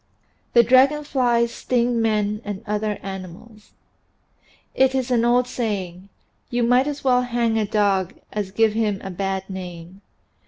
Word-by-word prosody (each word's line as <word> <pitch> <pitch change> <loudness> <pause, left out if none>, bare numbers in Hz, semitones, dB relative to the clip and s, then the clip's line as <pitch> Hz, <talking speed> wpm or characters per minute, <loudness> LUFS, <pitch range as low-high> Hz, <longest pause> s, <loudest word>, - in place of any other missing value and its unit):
THAT 235 -2 +5
DRAGON 275 +4 +5
FLIES 240 -4 +1
STING 240 -1 0
MEN 210 -1 0
AND 205 0 -6
OTHER 210 0 -2
ANIMALS 195 +3 -10 1.0
)T - - +4
is 260 -1 -1
an 235 -2 +3
old 245 +1 +3
saying, 200 -6 -4 0.4
"You 240 -1 0
might 250 +3 +3
as 290 -1 -4
well 250 -2 +3
hang 235 -2 0
a 210 - -1
dog 200 -3 +1 0.2
as 205 -2 -3
give 220 +2 +2
him 215 -3 0
a 190 - -5
bad 190 +1 -3
name." 180 -1 -9
220 Hz, 150 wpm, -22 LUFS, 195-245 Hz, 1.0 s, THAT